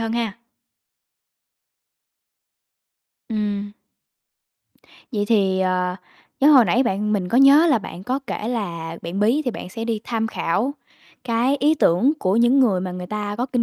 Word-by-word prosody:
hơn 225 0 -2
ha! 230 -3 -3 2.9
Ừm. 205 -2 -3 1.4
Vậy 205 -2 -1
thì, 190 -4 +2
à, 180 0 0 0.4
nhớ 285 +3 +6
hồi 260 -5 +7
nãy 245 +4 +2
bạn 210 -1 -1
mình 190 -3 -1
có 235 - +2
nhớ 280 +4 +7
là 285 -8 +3
bạn 185 -3 -9
có 255 +5 -1
kể 220 -1 -4
là 170 -8 -4
bạn 175 +4 -4
bí 240 +9 +2
thì 250 - 0
bạn 215 - -8
sẽ 225 +4 -6
đi 225 -2 -2
tham 225 -2 -2
khảo 225 +7 -2 0.5
cái 245 +4 +1
ý 300 +3 +2
tưởng 245 - +3
của 190 -2 0
những 240 +4 +4
người 205 -8 +2
mà 180 0 -4
người 180 0 -7
ta 210 0 -4
có 245 - -1
kinh 245 -2 -1
220 Hz, 165 wpm, -21 LUFS, 190-245 Hz, 2.9 s, hồi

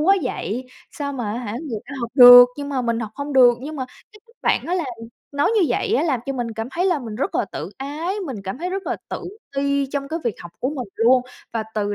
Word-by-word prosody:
quá 385 +6 +5
vậy, 255 -1 -3 0.2
sao 285 -1 -4
mà 235 -6 -3
á 235 - -3
hả 235 -4 -5
người 245 -2 -4
ta 285 - -7
học 235 -1 -4
được, 245 -1 +11
nhưng 285 -1 -5
mà 265 -3 -1
mình 235 -1 -1
học 220 -2 -4
hông 285 +1 -5
được. 250 -3 +7
Nhưng 305 +4 -6
mà 260 - -2 0.3
cái 425 - -17
cách 465 +1 -25
bạn - - +1
đó 350 - 0
làm 345 -5 -1 0.5
nói 285 +5 +2
như 415 - +4
vậy 435 - 0
á - - +2
làm 285 -8 0
cho 275 - -1
mình 245 -3 -3
cảm 225 +2 -5
thấy 350 +7 0
là 355 -5 +2
mình 230 -5 -7
rất 270 - -2
là - - +1
tự - - -5
ái, 305 +8 -3
mình 265 -5 -5
cảm 190 +6 -5
thấy 355 +3 -3
rất 385 +1 -4
là - - -1
tự - - -5 0.3
ti 280 0 +1
trong 275 -1 -3
cái 320 +2 -2
việc 235 -4 0
học 175 - -9
của 255 - 0
mình 260 -7 -5
luôn, 245 +3 +4 0.3
và 225 -1 -1
từ 205 -1 -1
270 Hz, 270 wpm, -22 LUFS, 235-300 Hz, 0.5 s, được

